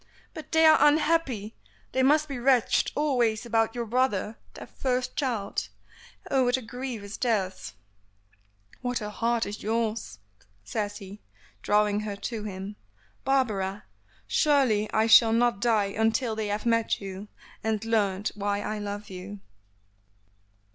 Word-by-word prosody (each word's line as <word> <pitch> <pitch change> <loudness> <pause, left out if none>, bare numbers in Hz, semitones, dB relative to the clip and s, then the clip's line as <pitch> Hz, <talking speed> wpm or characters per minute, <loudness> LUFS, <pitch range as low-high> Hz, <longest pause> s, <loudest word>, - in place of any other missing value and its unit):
"But 315 - -9
they 320 0 +5
are 315 0 +7
unhappy; 295 -8 +2 0.4
they 260 - +1
must 300 +3 +4
be 275 -4 -5
wretched 250 -2 +3
always 245 -7 +1
about 225 -1 +1
your 240 -1 -2
brother, 225 -3 0 0.2
their - - -8
first 255 -1 -2
child. 235 -8 -2 0.6
Oh! 270 -1 +3
what 245 +1 +2
a - - -6
grief 245 -1 -6
is 200 +1 -7
theirs!" 190 - -1 1.1
"What 245 -1 -1
a 210 -1 -5
heart 230 +2 0
is 205 +1 -6
yours!" 220 - -2 0.5
says 205 - -3
he, 200 0 -11 0.4
drawing 210 - +2
her 210 -1 -4
to 210 +2 -5
him. 200 +1 -6 0.5
"Barbara! 215 -7 0 0.4
surely 260 -9 +2
I 220 0 +2
shall 225 0 +7
not 235 -2 +2
die 210 -4 +2
until 225 +1 +1
they 215 -1 -2
have 205 +2 -3
met 230 -1 +1
you, 195 +1 -7 0.4
and 220 0 -1
learned 205 -3 0
why 205 0 -2
I 215 +1 -3
love 205 0 -6
you." 190 +2 -8
220 Hz, 140 wpm, -27 LUFS, 205-250 Hz, 1.1 s, are